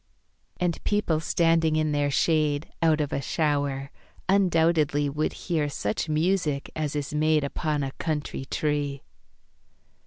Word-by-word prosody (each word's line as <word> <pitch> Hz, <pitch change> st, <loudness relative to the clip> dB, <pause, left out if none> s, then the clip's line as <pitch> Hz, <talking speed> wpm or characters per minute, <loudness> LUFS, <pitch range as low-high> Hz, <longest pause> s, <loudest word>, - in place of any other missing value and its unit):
And 175 Hz, -2 st, -1 dB
people 205 Hz, -7 st, +1 dB
standing 165 Hz, -1 st, +2 dB
in 155 Hz, -1 st, +1 dB
their 145 Hz, -1 st, +1 dB
shade 150 Hz, 0 st, +1 dB
Out 160 Hz, -2 st, +3 dB
of 145 Hz, -, -2 dB
a 140 Hz, -, -1 dB
shower, 140 Hz, -2 st, -1 dB, 0.4 s
undoubtedly 165 Hz, -6 st, +3 dB
Would 150 Hz, +2 st, -1 dB
hear 155 Hz, -5 st, 0 dB
such 110 Hz, +2 st, -2 dB
music 155 Hz, -2 st, 0 dB
as 150 Hz, -2 st, -2 dB
is 145 Hz, -1 st, -3 dB
made 155 Hz, 0 st, +2 dB
Upon 150 Hz, +1 st, -1 dB
a 135 Hz, -, -3 dB
country 150 Hz, -3 st, -3 dB
tree. 145 Hz, -1 st, -2 dB
150 Hz, 130 wpm, -26 LUFS, 145-160 Hz, 0.4 s, Out